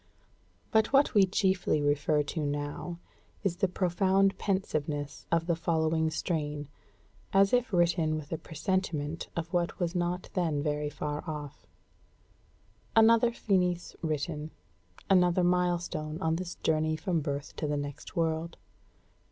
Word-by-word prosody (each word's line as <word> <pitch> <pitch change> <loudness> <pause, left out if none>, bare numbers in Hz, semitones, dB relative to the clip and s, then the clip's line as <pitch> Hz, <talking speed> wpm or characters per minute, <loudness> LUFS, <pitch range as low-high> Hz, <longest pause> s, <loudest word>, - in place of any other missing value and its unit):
But 220 -1 +3
what 275 0 +4
we 200 -3 +6
chiefly 185 -4 +1
refer 145 +1 +2
to 155 +2 -3
now 145 +4 -3 0.5
is 185 -4 0
the 195 - +2
profound 190 +2 +2
pensiveness 150 -7 -2
of 165 0 +2
the 170 -1 +1
following 160 -1 +1
strain, 150 -3 -2 0.7
as 195 +2 +5
if 250 -1 +2
written 170 -3 +2
with 155 -1 -6
a 160 - -2
presentiment 165 -2 -2
of 170 +1 -4
what 175 -1 0
was 175 -1 -1
not 180 0 -2
then 160 -6 0
very 150 -1 -1
far 150 0 -4
off: 150 -2 -7 1.3
"Another 230 +1 +6
Finis 180 -6 0
written; 155 -1 -2 0.6
another 180 -1 +4
milestone 175 -3 0
on 160 0 +1
this 175 0 -5
journey 155 0 +1
from 170 -1 -1
birth 140 -1 -4
to 150 - -2
the 145 0 0
next 145 -1 -6
world. 165 0 -1
165 Hz, 135 wpm, -30 LUFS, 150-185 Hz, 1.3 s, we